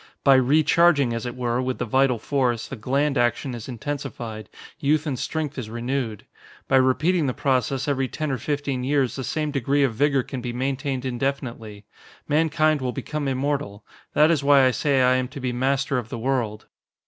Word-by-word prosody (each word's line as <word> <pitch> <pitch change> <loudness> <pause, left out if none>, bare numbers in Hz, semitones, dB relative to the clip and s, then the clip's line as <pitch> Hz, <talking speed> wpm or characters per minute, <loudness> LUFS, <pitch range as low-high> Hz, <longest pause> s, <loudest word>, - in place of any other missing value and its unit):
By 140 - +6
recharging, 145 +1 +4
as 115 +1 -3
it 120 - -5
were, 125 0 -1
with 130 0 -2
the 125 - -2
vital 130 +1 +2
force, 125 -1 -1
the - - -6
gland 135 +4 0
action 120 +2 0
is 120 +1 -7
intensified, 120 -5 -6 0.3
youth 150 +2 +1
and 135 -5 -2
strength 155 -3 -3
is 110 -4 -6
renewed. 120 -2 -3 0.4
By 135 - +4
repeating 150 +5 +2
the 125 - -2
process 135 +1 0
every 135 -2 0
ten 155 +2 -3
or 130 - -2
fifteen 140 -1 -2
years 135 -1 +1
the 130 - -4
same 155 +1 -2
degree 140 +1 +1
of 130 -4 +1
vigor 140 +2 +2
can 130 0 -6
be 120 0 -4
maintained 135 +1 -2
indefinitely. 120 -5 -4 0.4
Mankind 155 -1 +2
will 125 -1 -1
become 145 +2 -4
immortal. 135 -5 -2 0.3
That 155 +2 +5
is 150 -4 +1
why 140 -1 +6
I 130 - +4
say 135 0 +2
I 130 0 +4
am 130 0 -1
to 140 +2 -9
be 125 -2 -2
master 135 +1 0
of 115 -2 -8
the 125 - -5
world." 115 -3 -2
135 Hz, 190 wpm, -24 LUFS, 125-145 Hz, 0.4 s, By